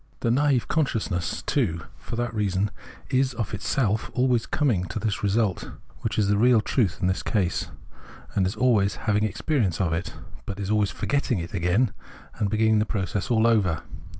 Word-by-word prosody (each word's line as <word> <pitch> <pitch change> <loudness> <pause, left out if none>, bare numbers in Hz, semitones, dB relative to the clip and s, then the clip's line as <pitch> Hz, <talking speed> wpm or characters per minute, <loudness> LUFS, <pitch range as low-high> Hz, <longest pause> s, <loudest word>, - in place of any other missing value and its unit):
The 115 - +1
naive 135 -1 +2
consciousness, 105 - -1
too, 85 - 0 0.2
for - - -6
that 120 0 -2
reason, 100 -2 0 0.4
is 130 -1 +2
of 115 -4 -3
itself 110 +2 0
always 125 -2 +2
coming 115 -12 +1
to 90 - -6
this 105 -1 -1
result, 100 -1 0 0.3
which - - -3
is 105 -2 +3
the 100 0 +2
real 120 0 +5
truth 105 -3 0
in - - +1
this 95 +1 +1
case, 95 -6 0 0.7
and 95 -2 +2
is 95 - -3
always 110 -6 +2
having 105 -1 +2
experience 110 - 0
of 85 -4 +1
it: 85 - -3 0.3
but 100 0 -5
is 100 0 -2
always 105 -2 +2
forgetting 140 -5 -1
it 85 -1 -5
again 95 +5 +1 0.5
and 105 - +1
beginning 110 +1 +3
the 105 - +2
process 95 -1 -2
all 115 -2 +3
over. 100 -8 +2
105 Hz, 180 wpm, -25 LUFS, 95-120 Hz, 0.7 s, real